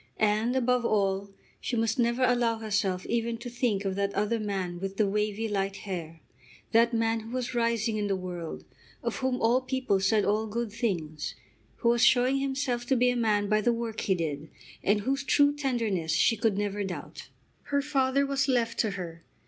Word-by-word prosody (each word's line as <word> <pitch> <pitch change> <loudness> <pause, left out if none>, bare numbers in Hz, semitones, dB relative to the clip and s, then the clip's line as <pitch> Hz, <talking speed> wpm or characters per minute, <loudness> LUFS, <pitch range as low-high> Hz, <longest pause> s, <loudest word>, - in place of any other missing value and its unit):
And, 215 +3 +2
above 250 -1 +2
all, 200 -3 +1 0.3
she 245 - -3
must 225 +1 0
never 240 +2 +2
allow 240 -2 +2
herself 205 -4 -1
even 235 0 -1
to 240 +1 -8
think 230 -5 0
of 195 - 0
that 200 0 0
other 210 +3 +1
man 190 -4 -3
with 195 +1 -5
the 215 - +3
wavy 210 +2 -1
light 195 -2 -1
hair, 165 -4 -5 0.5
that 230 +1 +5
man 225 -1 +1
who 220 0 -10
was 250 +1 -3
rising 230 -2 +1
in 205 -1 -1
the 195 - +1
world, 180 -3 -6 0.4
of - - -2
whom 260 -1 -1
all 240 +3 +3
people 255 -6 0
said 200 +2 +2
all 215 +2 +1
good 230 +1 -3
things, 170 -10 -3 0.4
who 235 - +1
was 235 0 +3
showing 250 +2 +5
himself 270 -3 -1
to 265 - +3
be 250 0 +3
a - - -2
man 210 -3 +1
by 215 +1 +2
the 240 - +3
work 230 -2 -3
he 190 - +1
did, 155 -3 -3 0.3
and 205 +1 +2
whose 275 +5 -1
true 285 +1 +4
tenderness 225 - -1
she 225 - +4
could 220 -2 +1
never 205 0 -1
doubt. 190 -2 -7 0.4
Her 280 0 0
father 275 -1 +2
was 275 0 0
left 245 -4 +1
to 220 - +2
her. 165 -2 -7
225 Hz, 195 wpm, -28 LUFS, 200-245 Hz, 0.5 s, that